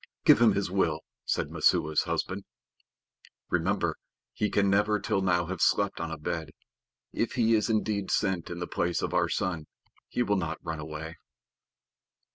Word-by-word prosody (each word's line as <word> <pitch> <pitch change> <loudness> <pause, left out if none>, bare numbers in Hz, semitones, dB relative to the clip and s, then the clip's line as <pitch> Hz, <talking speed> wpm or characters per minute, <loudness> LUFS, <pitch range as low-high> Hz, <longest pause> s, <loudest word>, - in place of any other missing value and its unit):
"Give - - +7
him - - +6
his - - -1
will," - - +1 0.2
said - - -1
Messua's 75 0 +2
husband. 95 +2 -2 1.1
"Remember - - +1 0.4
he 105 - 0
can 100 0 +2
never 105 +2 +3
till 95 - 0
now 90 -2 +2
have 95 +3 -5
slept 100 -1 +2
on 85 0 -3
a 80 - -5
bed. 80 +1 -3 0.6
If 115 - -1
he 115 -2 +3
is 110 0 +2
indeed 105 -2 0
sent 95 -5 0
in 90 - -5
the 90 - -3
place 85 0 -1
of - - -2
our - - +2
son 85 -5 -2 0.4
he 125 - 0
will 105 -3 +1
not 80 -3 -2
run 80 -1 -4
away." 80 +2 -7
95 Hz, 165 wpm, -28 LUFS, 80-105 Hz, 1.1 s, Give